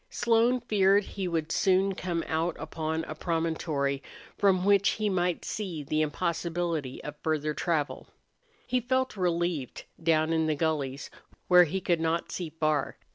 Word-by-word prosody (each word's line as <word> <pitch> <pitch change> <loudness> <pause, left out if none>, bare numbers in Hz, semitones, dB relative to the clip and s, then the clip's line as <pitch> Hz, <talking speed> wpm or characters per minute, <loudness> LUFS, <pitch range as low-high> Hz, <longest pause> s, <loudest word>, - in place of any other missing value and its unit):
Slone 240 +1 +2
feared 200 -3 +3
he 195 -1 -4
would 165 -2 -2
soon 195 +1 +3
come 175 -3 -2
out 165 +1 -1
upon 160 0 -3
a 155 - -6
promontory 155 -4 -1 0.3
from 190 -2 +3
which 200 0 +5
he 215 -1 0
might 180 -2 0
see 180 -8 -4
the 155 +2 0
impossibility 165 -2 -2
of 150 - -6
further 155 -1 -1
travel. 155 -1 -2 0.6
He 255 0 +1
felt 260 +1 0
relieved 175 - -1 0.2
down 160 -1 +2
in 160 -1 +1
the 155 - +1
gullies, 140 -3 -2 0.4
where 180 -1 +7
he 190 +4 -2
could 170 -3 0
not 165 +1 -1
see 175 -3 -4
far. 155 -2 -1
170 Hz, 150 wpm, -28 LUFS, 155-190 Hz, 0.6 s, where